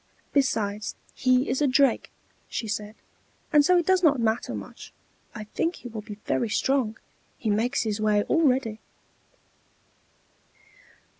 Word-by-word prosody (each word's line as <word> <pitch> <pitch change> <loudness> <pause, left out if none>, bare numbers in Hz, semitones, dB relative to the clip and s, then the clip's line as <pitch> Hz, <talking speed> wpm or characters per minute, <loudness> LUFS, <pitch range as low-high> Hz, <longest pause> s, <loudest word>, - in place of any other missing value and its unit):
"Besides, 215 -7 0 0.2
he 255 0 +2
is 255 +3 -1
a 290 - +4
drake," 270 +1 +3 0.4
she 225 - -3
said, 210 0 -4 0.6
"and 295 -1 +7
so 360 +4 +4
it 345 - +1
does 375 -1 +3
not 295 -6 +4
matter 225 0 0
much. - - -9 0.4
I 215 - -5
think 330 +11 -2
he 245 - -9
will 220 -2 -6
be 210 -1 -9
very 235 - 0
strong: 235 -1 0 0.4
he 220 - -1
makes 235 +6 +1
his 215 -1 -2
way 210 -1 +3
already." 255 -8 +1
240 Hz, 140 wpm, -26 LUFS, 215-275 Hz, 0.6 s, and